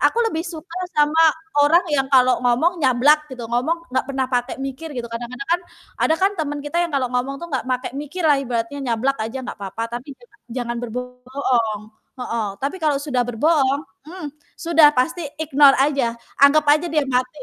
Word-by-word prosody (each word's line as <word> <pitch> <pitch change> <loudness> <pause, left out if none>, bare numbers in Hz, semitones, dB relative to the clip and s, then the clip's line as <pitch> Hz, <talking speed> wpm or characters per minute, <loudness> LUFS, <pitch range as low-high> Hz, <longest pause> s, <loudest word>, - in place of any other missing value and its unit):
aku - - +2
lebih 325 -8 -2
suka 335 -1 -9 0.2
sama 300 +2 +4 0.4
orang 335 +5 +4
yang 270 -2 +2
kalau 255 -1 +4
ngomong 260 +9 +1
nyablak 290 +3 +3
gitu, 250 -2 -7
ngomong 290 +9 -1
enggak - - +1
pernah 265 -1 -1
pakai 245 +1 -1
mikir 270 +4 -6
gitu. 240 - -3
Kadang-kadang 245 +4 -6
kan, 350 - +2 0.4
ada 320 - +3
kan 385 +3 +3
teman 295 -2 -2
kita 295 +3 -4
yang 345 - -1
kalau 265 -2 +1
ngomong 255 +2 -1
tuh - - -4
enggak 260 -3 -2
pakai 255 0 -2
mikir 295 +5 -5
lah 295 -2 +5
ibaratnya 240 +1 -3
nyablak 265 +5 0
aja 225 +4 -5
enggak 245 - -7
apa-apa, 225 +4 -5
tapi 250 - -19
jangan 250 +7 -23 0.2
jangan 240 -1 -3
berbo 245 +1 -3 0.2
bohong 240 -5 -1 0.4
heeh. 230 -3 -2 0.2
Tapi 285 +7 -2
kalau 300 -2 +2
sudah 280 -4 -1
berbohong, 275 +2 +2 0.3
hmm, 355 -2 -7 0.3
sudah 325 -2 +5
pasti 315 +5 0
ignore 285 -3 +5
aja, 275 -4 +1 0.3
anggap 295 +2 +6
aja 305 +4 +4
dia 305 -2 +2
mati. 255 +2 -1
275 Hz, 185 wpm, -21 LUFS, 250-310 Hz, 0.4 s, anggap